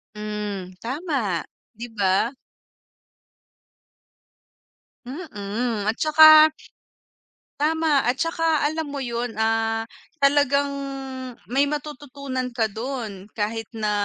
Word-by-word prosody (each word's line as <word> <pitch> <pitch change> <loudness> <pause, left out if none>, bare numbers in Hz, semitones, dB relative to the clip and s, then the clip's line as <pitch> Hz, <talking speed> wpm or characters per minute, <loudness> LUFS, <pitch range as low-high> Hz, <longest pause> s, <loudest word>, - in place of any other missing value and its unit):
Hmm, 210 -3 -5
tama, 255 - -2 0.3
'di 230 +3 -6
ba? 200 +5 +2 2.7
Mm, 230 - -3
at 220 - +1
tsaka 310 +1 +8 1.1
tama, 310 -2 +2
at 245 - +2
tsaka 330 +1 +1
alam 320 -1 -3
mo 280 -1 -4
yun, 235 -1 -3
ah, 225 0 +1 0.4
talagang 280 0 +3 0.8
may 275 +3 +3
matututunan 280 -3 -4
ka 220 -3 +1
dun 220 -4 -5
kahit 225 +1 -2
na 215 -1 -1
250 Hz, 90 wpm, -23 LUFS, 215-290 Hz, 2.7 s, tsaka